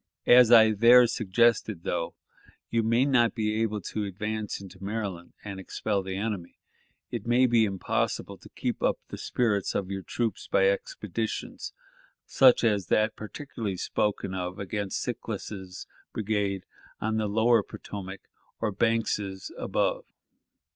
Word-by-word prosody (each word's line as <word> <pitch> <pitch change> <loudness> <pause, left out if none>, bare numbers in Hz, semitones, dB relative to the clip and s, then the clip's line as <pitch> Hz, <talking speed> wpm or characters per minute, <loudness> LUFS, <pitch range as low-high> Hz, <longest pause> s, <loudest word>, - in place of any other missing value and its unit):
As 120 -1 +7
I 110 -2 +8
there 120 +4 +7
suggested, 110 -3 +1
though 85 -1 -2 0.6
you 115 - +2
may 115 +4 +3
not 120 -5 +3
be 110 -1 0
able 110 -2 -1
to 105 +4 -4
advance 105 +2 -4
into 95 0 -12
Maryland 100 -4 -4
and 100 -2 -6
expel 100 +2 -2
the 95 0 -5
enemy, 100 -4 -4 0.5
it 115 -2 -5
may 125 +2 +4
be 115 -3 +3
possible - - -1
to - - -15
keep - - -3
up - - +2
the - - -6
spirits 105 -6 0
of 95 -1 -2
your 95 0 -3
troops 115 +1 -3
by 95 0 +4
expeditions 105 +2 -4 0.5
such 130 -2 +5
as 105 -6 +2
that 110 +4 +2
particularly 110 -3 -5
spoken 100 0 -1
of 90 0 -4
against 100 0 -3
Sickles's 95 -3 -5 0.3
brigade 100 -3 -1 0.3
on 110 0 -1
the 110 -1 0
lower 110 +2 +4
Potomac, 100 -1 -8 0.4
or 110 -2 0
Banks's 105 -3 -1
above. - - -1
105 Hz, 140 wpm, -27 LUFS, 95-115 Hz, 0.6 s, I